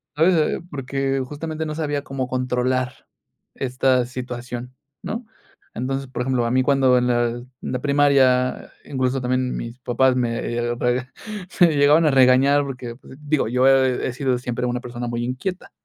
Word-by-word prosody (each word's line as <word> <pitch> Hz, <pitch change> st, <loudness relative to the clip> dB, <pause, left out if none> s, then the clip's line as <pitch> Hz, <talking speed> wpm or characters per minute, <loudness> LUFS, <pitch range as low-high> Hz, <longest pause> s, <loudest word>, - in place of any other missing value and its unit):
sabes, 160 Hz, 0 st, +3 dB
porque 135 Hz, 0 st, -2 dB
justamente 155 Hz, +3 st, -5 dB
no 155 Hz, -1 st, -4 dB
sabía 145 Hz, -2 st, -2 dB
cómo 135 Hz, -2 st, -4 dB
controlar 125 Hz, 0 st, -1 dB, 0.5 s
esta 130 Hz, -1 st, +1 dB
situación, 125 Hz, 0 st, -6 dB, 0.3 s
¿no?, 230 Hz, +3 st, -5 dB, 0.5 s
entonces, 135 Hz, +2 st, -3 dB
por 130 Hz, -, -5 dB
ejemplo, 125 Hz, -2 st, 0 dB
a 115 Hz, -, -1 dB
mí 130 Hz, +1 st, +3 dB
cuando 130 Hz, -2 st, +4 dB
en 125 Hz, -, 0 dB
la 120 Hz, -1 st, +2 dB
en 120 Hz, +1 st, -7 dB
la 125 Hz, -, -3 dB
primaria, 140 Hz, -3 st, +3 dB
incluso 130 Hz, -1 st, -1 dB
también 130 Hz, 0 st, -1 dB
mis 115 Hz, +2 st, -7 dB
papás 130 Hz, +1 st, +2 dB
me 120 Hz, -2 st, 0 dB
eh 120 Hz, 0 st, -2 dB
rega 125 Hz, +2 st, -1 dB, 0.5 s
me 175 Hz, -, +9 dB
llegaban 145 Hz, +3 st, +5 dB
a 150 Hz, -, +4 dB
regañar 135 Hz, +2 st, +5 dB
porque, 125 Hz, -4 st, -6 dB, 0.3 s
digo, 150 Hz, -5 st, 0 dB
yo 125 Hz, +2 st, +2 dB
he 130 Hz, -2 st, +3 dB
sido 130 Hz, -1 st, 0 dB
siempre 125 Hz, 0 st, -3 dB
una 125 Hz, 0 st, -2 dB
persona 120 Hz, 0 st, -6 dB
muy 120 Hz, 0 st, -2 dB
inquieta, 150 Hz, +10 st, -4 dB
130 Hz, 160 wpm, -22 LUFS, 125-140 Hz, 0.5 s, me